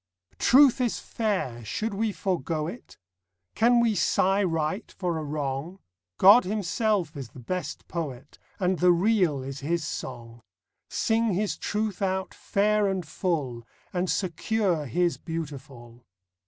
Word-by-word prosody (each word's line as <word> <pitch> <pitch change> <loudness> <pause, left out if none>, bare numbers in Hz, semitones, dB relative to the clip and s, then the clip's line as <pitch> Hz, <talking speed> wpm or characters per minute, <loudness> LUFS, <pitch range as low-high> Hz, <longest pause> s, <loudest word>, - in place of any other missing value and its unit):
Truth 265 -1 +6
is 240 -3 0
fair; 190 - -2
should 215 - -3
we 215 +2 0
forego 165 -6 -2
it? 225 +10 -9 0.6
Can 240 +1 +4
we 235 -2 +3
sigh 195 +2 +2
right 165 +2 -1
for 175 -4 -2
a - - -4
wrong? 145 +3 -3 0.4
God 205 +6 +8
Himself 200 -3 0
is 135 -5 -6
the 130 - -13
best 155 +5 -5
Poet, 145 -5 -6 0.2
And 185 -1 +1
the 180 0 +5
Real 175 -6 +2
is 135 +1 -6
His 165 +4 -1
song. 120 -5 -6 0.5
Sing 225 -3 +1
His 205 +2 0
Truth 210 -2 -2
out 190 -1 -1
fair 210 +1 +1
and 190 -3 -2
full, 145 -10 -2 0.3
And 180 0 -1
secure 185 -3 0
His 175 +8 +1
beautiful. 135 -7 -7
180 Hz, 135 wpm, -27 LUFS, 145-205 Hz, 0.6 s, God